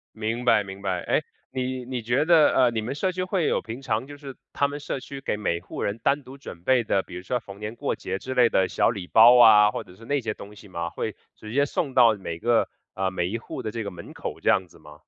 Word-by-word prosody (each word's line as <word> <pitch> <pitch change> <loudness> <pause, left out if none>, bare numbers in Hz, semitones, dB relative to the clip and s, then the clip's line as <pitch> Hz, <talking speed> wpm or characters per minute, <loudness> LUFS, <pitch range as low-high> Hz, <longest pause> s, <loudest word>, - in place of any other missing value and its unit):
明 115 +3 -3
白 105 -4 +4
明 95 0 -9
白。 95 -2 -1
哎， - - +1 0.3
你 130 -1 -3
你 125 -2 -4
觉 120 +6 +1
得 165 -2 +5
呃， 125 -2 +4
你 110 -1 -2
们 125 +5 -4
社 185 +6 0
区 185 0 -2
会 185 -3 0
有 - - +1
平 115 +4 -7
常 115 0 -1
就 145 - -10
是 140 -2 -10 0.2
他 140 - +1
们 145 +1 -5
社 140 -2 -4
区 135 +1 -8
给 105 - -2
每 85 -5 -1
户 - - -7
人 105 +3 -2
单 140 +5 +1
独 130 +1 -12
准 85 - -10
备 130 -3 +3
的， 95 -2 +1
比 90 - -12
如 90 - -6
说 125 +5 -2
逢 100 -3 -12
年 105 +2 -5
过 - - -2
节 95 - -4
之 130 +4 -6
类 125 -2 +5
的 95 -3 +2
小 - - +2
礼 95 -6 -5
包 120 +5 +7
啊， 105 -3 +8
或 - - -4
者 90 - -16
是 115 - -14
那 140 +3 0
些 110 -2 -3
东 105 +1 -11
西 105 -1 -14
吗？ 85 -1 -4
会 - - -4 0.2
直 110 0 -10
接 140 +2 +3
送 140 -1 -2
到 115 -2 +6
每 85 -4 -6
个 120 +6 +2 0.3
呃， 95 0 -1
每 90 -1 -1
一 115 +5 -3
户 115 - -7
的 110 - -3
这 115 0 -4
个 100 - -4
门 85 -2 -11
口 - - -6
这 - - +3
样 95 - +2
子 - - -19
吗？ 75 0 -15
115 Hz, 300 characters per minute, -25 LUFS, 100-130 Hz, 0.3 s, 啊